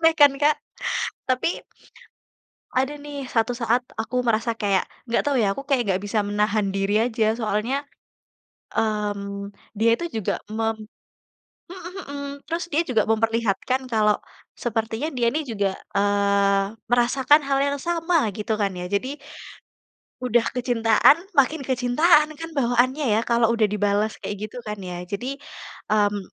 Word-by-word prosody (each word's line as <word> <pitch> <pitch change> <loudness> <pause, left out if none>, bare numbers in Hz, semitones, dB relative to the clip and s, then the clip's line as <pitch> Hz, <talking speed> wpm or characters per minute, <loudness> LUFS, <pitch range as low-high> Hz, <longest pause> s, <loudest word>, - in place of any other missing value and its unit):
aneh 325 0 +5
kan, 290 -1 +8
Kak? 300 +1 +4 0.7
Tapi, 255 +6 0 1.1
ada 265 +3 +1
nih 285 -2 -7
satu 225 +1 +1
saat 240 +1 +1 0.2
aku 235 +3 -1
merasa 230 +1 +1
kayak, 200 -3 +1 0.2
enggak 235 - +2
tahu 280 - +1
ya, 195 - +2
aku 275 - -6
kayak 265 -3 +3
enggak 185 - +1
bisa 205 0 0
menahan 205 -1 0
diri 195 +1 +1
aja. 220 -2 +1
Soalnya, 235 +6 -1 0.9
mmm, 205 -2 -2 0.3
dia 230 +1 +4
itu 345 - -4
juga 205 - -1 0.2
mem 225 0 0 0.9
mhm 360 -1 -9 0.2
mhm, 285 0 -5 0.2
terus 335 +1 -2
dia 300 - +3
juga 250 -10 +1
memperlihatkan 225 +3 0
kalau, 210 -1 +3 0.4
sepertinya 225 +6 -2
dia 240 -2 +1
ini 305 +6 -1
juga, 200 -6 -1 0.2
eee, 200 -1 +2 0.2
merasakan 255 +5 +4
hal 275 0 +1
yang 280 0 +1
sama, 335 0 +1
gitu 215 +2 -2
kan, 200 -2 0
ya. 180 -1 -5
Jadi 255 +9 -2 1.1
udah 240 -1 +3
kecintaan, 240 +1 +4 0.2
makin 285 -1 +2
kecintaan 300 +5 +3
kan, 330 +2 -7
bawaannya 255 0 +1
ya, - - +3
kalau 235 -1 +2
udah 225 - +1
dibalas 205 +1 0
kayak, 205 - -5
gitu 250 - -7
kan, 210 - -3
ya. 180 -1 -5
Jadi, 255 +9 -4 0.5
mmm, 205 -1 +2
230 Hz, 145 wpm, -24 LUFS, 210-275 Hz, 1.1 s, kan